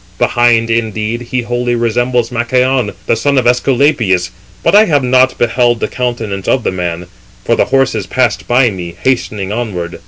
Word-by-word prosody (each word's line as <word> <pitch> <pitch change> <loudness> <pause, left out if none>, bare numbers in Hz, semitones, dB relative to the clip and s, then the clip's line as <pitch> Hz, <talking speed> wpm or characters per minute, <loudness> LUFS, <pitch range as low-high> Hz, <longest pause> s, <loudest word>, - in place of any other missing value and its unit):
Behind, 115 -1 +2
indeed, 110 0 -2
he 120 +1 -3
wholly 120 0 -1
resembles 120 +1 0
Machaon, 125 -1 0
the - - +1
son 140 +5 0
of 130 - +2
Æsculapius, 120 - +1 0.3
but - - +2
I 210 +2 +7
have 145 -8 +1
not 130 +1 +3
beheld 120 0 +1
the - - -1
countenance 115 -6 -4
of 130 - +1
the - - -1
man: 90 -1 -4 0.4
for 115 - +2
the - - +2
horses 125 -7 0
passed 125 +2 0
by 120 -1 +3
me, 85 -3 -7
hastening 105 -6 -1
onward." 100 -7 -4
120 Hz, 165 wpm, -13 LUFS, 110-125 Hz, 0.4 s, I